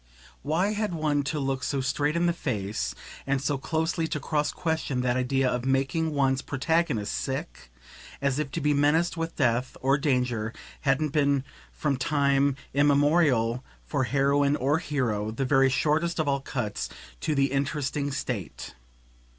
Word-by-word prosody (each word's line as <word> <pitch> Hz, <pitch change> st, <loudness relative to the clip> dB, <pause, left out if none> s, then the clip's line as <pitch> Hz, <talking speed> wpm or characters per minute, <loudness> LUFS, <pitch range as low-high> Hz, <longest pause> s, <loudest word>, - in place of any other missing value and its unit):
Why 165 Hz, +8 st, +1 dB
had 210 Hz, -4 st, -1 dB
one 150 Hz, -2 st, +1 dB
to 150 Hz, +2 st, -1 dB
look 135 Hz, -1 st, -1 dB
so 140 Hz, +1 st, -1 dB
straight 145 Hz, +4 st, 0 dB
in 170 Hz, +1 st, +2 dB
the 170 Hz, -, +3 dB
face 100 Hz, -, -3 dB, 0.3 s
and 135 Hz, 0 st, +1 dB
so 140 Hz, 0 st, -1 dB
closely 160 Hz, +3 st, -1 dB
to 155 Hz, -, -2 dB
cross 150 Hz, 0 st, 0 dB
question 160 Hz, -6 st, -1 dB
that 125 Hz, -1 st, +1 dB
idea 130 Hz, +1 st, +1 dB
of 125 Hz, -1 st, -1 dB
making 135 Hz, +5 st, +1 dB
one's 135 Hz, -1 st, +2 dB
protagonist 140 Hz, -7 st, 0 dB
"sick"? 135 Hz, -, -4 dB, 0.5 s
as 140 Hz, 0 st, 0 dB
if 150 Hz, -2 st, -2 dB
to -, -, -2 dB
be 150 Hz, +1 st, +2 dB
menaced 150 Hz, +5 st, +2 dB
with 165 Hz, 0 st, -3 dB
death 125 Hz, -2 st, 0 dB
or 135 Hz, +2 st, +2 dB
danger 125 Hz, -6 st, 0 dB, 0.3 s
hadn't 145 Hz, +2 st, +1 dB
been 140 Hz, -2 st, +2 dB, 0.3 s
from 145 Hz, -3 st, -1 dB
time 140 Hz, 0 st, +2 dB, 0.2 s
immemorial, 140 Hz, -4 st, +3 dB, 0.2 s
for 135 Hz, -3 st, 0 dB
heroine 140 Hz, +2 st, +2 dB
or 145 Hz, +3 st, +1 dB
hero, 120 Hz, -, -1 dB
the 115 Hz, +5 st, -2 dB
very 135 Hz, 0 st, +4 dB
shortest 155 Hz, +5 st, +1 dB
of 155 Hz, -2 st, 0 dB
all 140 Hz, -1 st, +1 dB
cuts 125 Hz, -6 st, -3 dB, 0.3 s
to 155 Hz, -, -1 dB
the 140 Hz, -1 st, +2 dB
interesting 140 Hz, 0 st, -1 dB
state. 125 Hz, -, -4 dB
140 Hz, 160 wpm, -27 LUFS, 130-150 Hz, 0.5 s, very